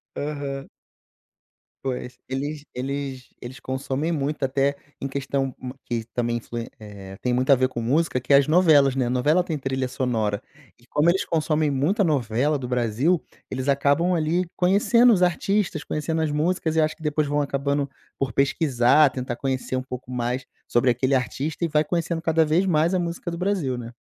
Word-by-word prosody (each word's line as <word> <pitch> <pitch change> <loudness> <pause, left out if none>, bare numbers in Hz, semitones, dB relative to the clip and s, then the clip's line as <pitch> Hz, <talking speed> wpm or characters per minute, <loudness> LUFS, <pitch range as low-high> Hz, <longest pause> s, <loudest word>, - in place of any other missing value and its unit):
Aham. 140 -2 -4 1.1
Pois, 125 -1 -4
eles 145 +3 -4
eles 135 0 -4
eles 125 +2 -8
consomem 135 +4 -2
muito, 145 -2 -2
até 135 +1 +1 0.2
em 135 - -3
questão 135 -1 -2
ma 125 0 -7
que 120 -2 -2
também 120 -1 0
influ 120 0 -6 0.2
eh, 100 -3 -10
tem 125 -1 0
muito 130 +3 +2
a - - +7
ver 130 0 +1
com 120 -2 -4
música 140 +3 +1
que 125 +3 0
é - - +9
as 140 +2 +2
novelas, 150 -6 +5
né, 130 -2 +1
novela 130 +8 +2
tem 160 -3 -2
trilha 130 -1 -2
sonora. 115 -5 -1 0.3
E 120 - -24
como 150 +3 +3
eles 185 +2 +2
consomem 155 -2 0
muita 155 - +1
novela 140 - +1
do 125 - -5
Brasil, 125 +8 +1 0.3
eles 130 +2 -3
acabam 145 +6 +2
ali 170 +2 +1
conhecendo 210 +6 +5
os 185 -3 +2
artistas, 195 +2 0
conhecendo 160 +1 -2
as 155 -2 0
músicas 160 +1 0
e 160 - +4
acho 155 0 0
que 160 - -14
depois 150 0 0
vão 145 +1 +1
acabando 140 0 -1 0.3
por 135 -3 -2
pesquisar, 140 0 +4
tentar 125 -2 -4
conhecer 130 0 -2
um 130 - -2
pouco 125 -1 -8
mais 125 +1 -2 0.2
sobre 125 +1 +3
aquele 130 +3 +1
artista 135 +6 -2
e 170 - +1
vai 150 0 +2
conhecendo 170 +1 -1
cada 160 -1 +3
vez 160 +5 +2
mais 165 -1 +2
a 185 - +2
música 175 0 -3
do 170 - -5
Brasil, 180 -9 -1
né. 120 -1 -7
140 Hz, 185 wpm, -24 LUFS, 130-160 Hz, 1.1 s, é